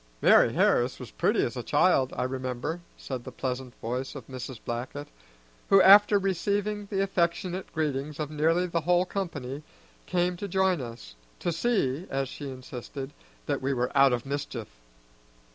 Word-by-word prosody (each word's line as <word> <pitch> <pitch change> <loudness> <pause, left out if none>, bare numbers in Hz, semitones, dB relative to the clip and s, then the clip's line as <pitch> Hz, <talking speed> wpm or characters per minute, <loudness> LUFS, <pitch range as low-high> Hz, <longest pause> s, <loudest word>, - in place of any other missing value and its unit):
"Mari' - - +6
Harris - - +2
was - - -9
pretty - - +1
as - - -4
a - - -3
child, 130 -1 +3
I - - 0
remember," 130 +5 -3 0.2
said 130 -3 -6
the - - -8
pleasant 130 -1 -4
voice 125 +4 -4
of 135 -5 -8
Mrs. 130 -1 -7
Blackett, 130 +5 -5 0.6
who, 195 - +7
after 205 +2 +8
receiving 200 +2 -1
the 195 -1 0
affectionate 185 0 -1
greetings 150 -1 -2
of 155 -1 -3
nearly 165 +4 +2
the 170 -1 -1
whole 175 +3 +3
company, 150 -8 -4 0.5
came 180 0 0
to 200 - -4
join 190 -3 +2
us, 115 - -8 0.3
to 175 - 0
see, 170 - 0
as 135 -1 -1
she 145 0 -7
insisted, 130 +2 -7 0.3
that - - -1
we 135 +1 0
were 125 +1 -2
out 135 -1 +6
of 125 0 -1
mischief. 135 -5 -4
145 Hz, 160 wpm, -28 LUFS, 130-180 Hz, 0.6 s, after